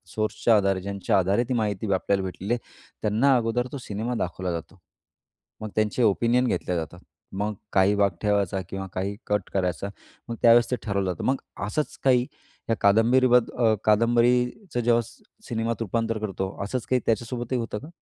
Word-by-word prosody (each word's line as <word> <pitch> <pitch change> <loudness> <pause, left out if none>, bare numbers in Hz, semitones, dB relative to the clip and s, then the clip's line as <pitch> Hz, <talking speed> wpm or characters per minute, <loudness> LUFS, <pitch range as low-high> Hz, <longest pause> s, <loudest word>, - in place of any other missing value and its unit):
सोर्सच्या 110 +1 +2
आधारे, 95 -2 +1
ज्यांच्या 100 0 0
आधारे 95 +5 +2
ती - - +1
माहिती 105 -3 -1
आपल्याला 95 +1 0
भेटलेली 95 +4 -3
आहे 120 - -1 0.4
त्यांना 115 +6 +3
अगोदर 120 +1 0
तो - - -5
सिनेमा 115 -1 -4
दाखवला 90 0 -3
जातो. 85 +3 -7 0.8
मग 110 - -4
त्यांचे 110 +3 +1
ओपिनियन 120 +4 +3
घेतले 90 - -1
जातात. 85 +1 -5 0.3
मग 105 +2 -2 0.2
काही 95 +2 +4
भाग 100 -1 +3
ठेवायचा 100 -3 +1
किंवा 95 0 -4
काही 95 +2 -2
कट 105 -2 -1
करायचा 90 0 -1 0.4
मग 115 - -3
त्यावेळेस 115 0 +6
ते - - +3
ठरवलं 100 -3 -1
जातं. 90 - -6
मग 135 - +3 0.2
अ, 95 - -3
असंच 150 +9 -2
काही 125 -2 +4 0.4
या 115 - +3
कादंबरी 115 +6 +4
बद 125 -1 +4
अ, 115 -2 +4
कादंबरीचं 120 - +2
जेव्हा 120 0 +3
स - - -17 0.3
सिनेमात 115 0 -2
रूपांतर 115 +1 -1
करतो 95 -3 -3
असंच 115 +4 -3
काही 130 -1 +2
त्याच्यासोबतही 120 +2 -1
होतं 115 -2 -4
का? 145 - -11
110 Hz, 175 wpm, -25 LUFS, 100-120 Hz, 0.8 s, त्यावेळेस